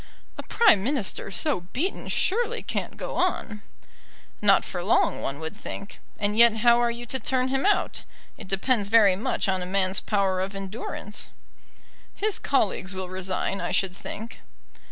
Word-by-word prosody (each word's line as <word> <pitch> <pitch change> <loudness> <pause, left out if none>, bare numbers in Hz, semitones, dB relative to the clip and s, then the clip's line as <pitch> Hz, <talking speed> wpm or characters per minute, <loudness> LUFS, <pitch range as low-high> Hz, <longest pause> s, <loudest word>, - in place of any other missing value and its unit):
"A - - -6
prime 325 - +4
minister 250 -7 -1
so 270 - +1
beaten 350 +9 -2
surely 475 +3 0
can't - - -4
go - - -5
on." 210 -2 -1 0.8
"Not 200 -2 +5
for 175 -1 -4
long, 205 - +2
one 135 +1 -4
would 160 0 -6
think. 200 - -8 0.2
And 205 0 -1
yet 230 0 +6
how 235 0 +6
are 240 - +2
you 235 +1 -5
to 265 +3 -3
turn 255 +2 0
him 270 +6 +1
out? 415 - +1 0.3
It - - -11
depends 200 +3 +1
very 205 -3 +5
much 205 - -1
on 190 -1 0
a - - -3
man's 190 0 +1
power 195 -3 0
of 195 +1 -4
endurance." 200 +1 -5 0.9
"His 420 -1 0
colleagues 200 -7 0
will 185 -1 -5
resign, 185 +1 -2
I - - -2
should 190 -2 0
think." 225 +4 -8
205 Hz, 165 wpm, -25 LUFS, 190-245 Hz, 0.9 s, yet